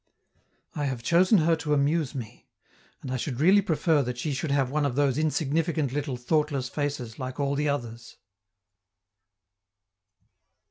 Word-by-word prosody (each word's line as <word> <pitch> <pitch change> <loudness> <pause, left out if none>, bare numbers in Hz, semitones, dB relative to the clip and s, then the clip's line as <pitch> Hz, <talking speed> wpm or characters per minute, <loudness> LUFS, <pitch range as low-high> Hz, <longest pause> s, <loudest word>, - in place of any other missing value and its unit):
I 145 - -2
have 130 -4 -3
chosen 180 - +4
her 165 -1 +3
to 150 -2 0
amuse 145 0 0
me, 120 -5 -8 0.6
and 130 - -5
I 130 - -1
should 125 0 -4
really 190 +7 +5
prefer 160 -4 +2
that 125 -2 -4
she 145 +4 -2
should 135 +4 -3
have 135 -2 +1
one 150 +1 0
of 140 -4 -1
those 140 -1 +2
insignificant 155 -1 0
little 140 -3 -2
thoughtless 140 0 0
faces 140 -6 -4
like 130 +1 -5
all 140 0 0
the 145 +1 0
others. 120 -5 -5
145 Hz, 150 wpm, -26 LUFS, 130-155 Hz, 0.6 s, really